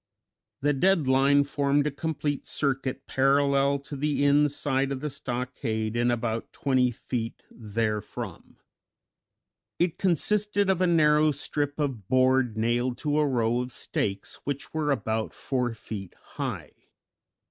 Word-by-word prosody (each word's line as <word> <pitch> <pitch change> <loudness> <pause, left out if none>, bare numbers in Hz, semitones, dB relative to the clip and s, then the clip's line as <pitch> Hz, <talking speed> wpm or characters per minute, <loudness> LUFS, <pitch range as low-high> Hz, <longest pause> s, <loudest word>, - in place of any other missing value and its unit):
The 145 +1 +2
"dead 170 0 +2
line" 135 +2 +4
formed 140 0 +1
a 150 - 0
complete 145 -1 -3
circuit 135 -1 -1
parallel 140 +1 +3
to 145 - -8
the 145 0 0
inside 140 -1 +2
of 135 - -2
the 150 +1 -4
stockade 120 -4 -3
and 120 +1 +2
about 115 -1 -2
twenty 130 -2 +2
feet 115 -1 -5
therefrom. 110 -1 -4 1.2
It 175 -1 0
consisted 205 +3 +2
of 185 -1 -1
a 185 - +4
narrow 155 -2 +4
strip 145 0 -2
of 130 -10 -2
board 130 -2 +3
nailed 120 +2 0
to 150 +1 0
a 150 - +3
row 120 -2 +1
of 125 0 -5
stakes, 100 -4 -3
which 140 0 -4
were 155 -2 0
about 110 -5 -1
four 125 -3 -2
feet 100 -4 -8
high. - - -5
135 Hz, 135 wpm, -27 LUFS, 120-145 Hz, 1.2 s, line